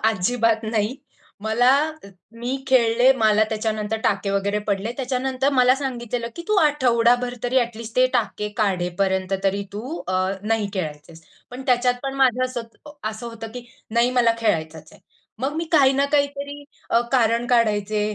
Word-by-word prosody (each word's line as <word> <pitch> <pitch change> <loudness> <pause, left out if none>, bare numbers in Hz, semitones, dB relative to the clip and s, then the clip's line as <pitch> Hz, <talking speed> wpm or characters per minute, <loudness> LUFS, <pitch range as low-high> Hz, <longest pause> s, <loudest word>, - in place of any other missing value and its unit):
अजिबात 225 +2 +1
नाही. 220 +3 -1 0.5
मला 235 +4 +3 0.7
मी 250 +3 -2
खेळले, 245 -1 +4
मला 215 -3 +3
त्याच्यानंतर 215 0 -2
टाके 200 0 +1
वगैरे 200 +1 0
पडले. 205 +3 -1
त्याच्यानंतर 265 +1 -1
मला 255 -1 +5
सांगितलेलं 240 -3 -4
की 340 - -6
तू 425 - +2
आठवडाभर 245 -3 +2
तरी 245 +2 +2
ॲटलीस्ट 230 -1 -5
ते 255 0 +5
टाके 210 -4 -1
काढेपर्यंत 190 -1 0
तरी 195 +1 +1
तू 250 +11 -5
अ, 185 - -1 0.3
नाही 215 -1 0
खेळायचेस. 160 -2 -6 0.3
पण 250 +2 -7
त्याच्यात 250 -1 +3
पण 270 -1 -3
माझं 255 -2 +3
असं 255 -2 -4 0.5
असं 220 +2 -8
होतं 225 -1 -7
की 245 - -7 0.3
"नाही 235 +2 +2
मला 240 -2 +3
खेळायचचं 160 -8 -1
आहे." - - -18 0.4
मग 265 +5 -2
मी 330 - -1
काही 275 -4 +6
ना 275 +1 +2
काहीतरी 285 0 -1 0.3
अ, 230 - +4
कारण 235 -1 +2
काढायचे. 215 -3 +2
235 Hz, 150 wpm, -22 LUFS, 210-255 Hz, 0.7 s, काही